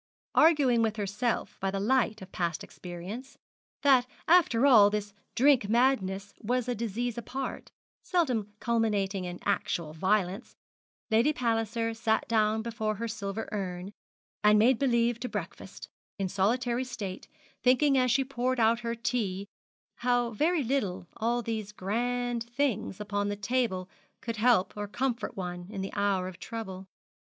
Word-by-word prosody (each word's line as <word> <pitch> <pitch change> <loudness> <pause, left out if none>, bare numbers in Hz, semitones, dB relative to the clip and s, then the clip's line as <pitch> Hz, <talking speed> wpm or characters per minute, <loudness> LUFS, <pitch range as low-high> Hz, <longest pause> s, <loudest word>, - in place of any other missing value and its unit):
Arguing 285 -7 +5
with 220 -1 +1
herself 215 +3 -2
by 195 - 0
the 195 0 -2
light 220 -1 +1
of 185 - -13
past 170 -2 -2
experience, 190 +9 -8 0.5
that 260 -3 +5 0.2
after 315 -8 +5
all 220 -7 +8
this 205 -1 -3 0.2
drink 255 -5 +4
madness 205 -5 +1
was 245 +2 0
a 245 - 0
disease 235 +1 -3
apart, 260 +3 -5 0.3
seldom 250 - 0
culminating 205 -5 0
in 175 0 -5
actual 200 -6 -1
violence, 190 +2 0 0.6
Lady 230 +7 +4
Palliser 230 -3 -1
sat 225 -1 0
down 220 -1 +2
before 220 -2 -2
her 230 +3 -3
silver 215 -1 -4
urn, 185 -2 -4 0.5
and 210 0 +6
made 235 +3 +4
believe 235 -3 +2
to 250 +1 -4
breakfast, - - -7 0.3
in 195 - -1
solitary 235 +6 +1
state, 205 -7 -6 0.3
thinking 270 +3 +4
as 255 -1 +3
she 270 +3 +3
poured 255 -1 -1
out 230 +1 +4
her 235 -1 -3
tea 225 -5 -2 0.5
how 245 -1 +1
very 310 +7 +1
little 205 -8 -1
all 235 +2 0
these 220 -2 -3
grand 240 +4 -1
things 240 -6 -1
upon 205 -1 -1
the 205 - -2
table 205 -3 -1 0.3
could 230 -1 -5
help 215 -5 +3
or 205 0 -4
comfort 240 +2 -2
one 180 -1 -5
in 200 -2 -5
the 195 - -5
hour 200 -2 +1
of 185 -2 -9
trouble. 190 -5 -6
225 Hz, 145 wpm, -29 LUFS, 200-245 Hz, 0.6 s, all